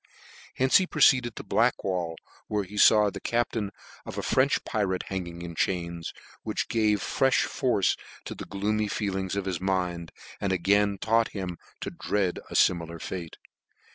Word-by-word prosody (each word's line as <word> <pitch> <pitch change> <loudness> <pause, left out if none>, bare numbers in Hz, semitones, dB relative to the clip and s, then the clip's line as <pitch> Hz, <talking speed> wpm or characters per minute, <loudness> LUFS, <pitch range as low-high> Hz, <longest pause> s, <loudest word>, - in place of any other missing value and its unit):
Hence 130 +1 +5
he 185 - +1
proceed 130 -6 +5
ed 120 - -9
to - - -7
Blackwall, 95 -8 0 0.3
where 105 -1 0
he 100 +2 -11
faw 105 0 +6
the - - -7
captain 115 -3 -1 0.3
of - - -8
a - - -2
French 130 +2 +2
pirate 95 -4 -1
hanging 85 -3 -5
in 85 -1 -6
chains, 85 -1 -2 0.3
which - - -3
gave 110 -2 +2
frefh 135 -1 +2
force 120 -7 +1 0.3
to - - -5
the - - -8
gloomy 105 +2 -1
feelings 95 -2 -2
of 100 -1 -2
his 90 -3 -3
mind, 90 -3 -1 0.3
and 100 - -1
again 100 +3 +2
taught 115 +3 +1
him 90 -3 -4 0.2
to - - -4
dread 95 -4 -1
a - - -7
fimilar 85 -1 +2
fate. 85 -1 -6
100 Hz, 165 wpm, -27 LUFS, 90-110 Hz, 0.3 s, faw